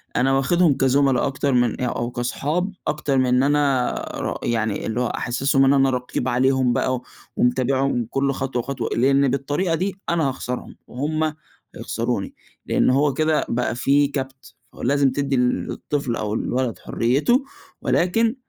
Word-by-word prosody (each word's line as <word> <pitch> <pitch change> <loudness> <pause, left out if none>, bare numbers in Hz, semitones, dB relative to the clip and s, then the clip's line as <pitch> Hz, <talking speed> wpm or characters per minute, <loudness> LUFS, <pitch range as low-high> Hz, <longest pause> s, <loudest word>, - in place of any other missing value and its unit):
أنا 135 +2 +2
واخذهم 145 +3 +3
كزملا 135 -1 +3
أكتر 140 0 -1
من 120 -2 +1
أ - - +1
أو 120 -1 -2
كأصحاب 150 +10 -2 0.2
أكتر 150 -2 0
من 125 0 +3
أنا 140 -3 +2 0.2
ر - - -3
يعني 110 -3 -1
اللي 115 +2 -1
هو 125 - +1
أحسسهم 135 +3 +1
إن 135 - +5
أنا 135 -1 +4
رقيب 125 -1 -2
عليهم 130 0 +2
بقى، 130 +1 0 0.3
ومتابعهم 130 0 +1
كُلّ 135 +1 0
خطوة 135 -2 -3
وخطوة، 125 -1 -3
لإني 135 +3 +3
بالطريقة 145 +6 0
دي 190 +4 -2
أنا 165 -4 +1
هاخسرهم، 125 -1 -5
وهُم 155 +4 -1 0.4
هيخسروني، 115 -4 -3 0.3
لأنّه - - +2
هو 140 +1 +2
كده 155 +1 +1
بقى 120 0 -1
في 140 +3 +3
كَبْت، 135 -2 -6 0.2
فلازم 140 +2 +2
تدّي 140 0 -1
للطفل 125 +1 -1
أو 105 -2 -3
الولد 125 +2 -2
حريته، 145 - +1 0.4
ولكن 225 +7 +1
135 Hz, 145 wpm, -22 LUFS, 125-145 Hz, 0.4 s, إن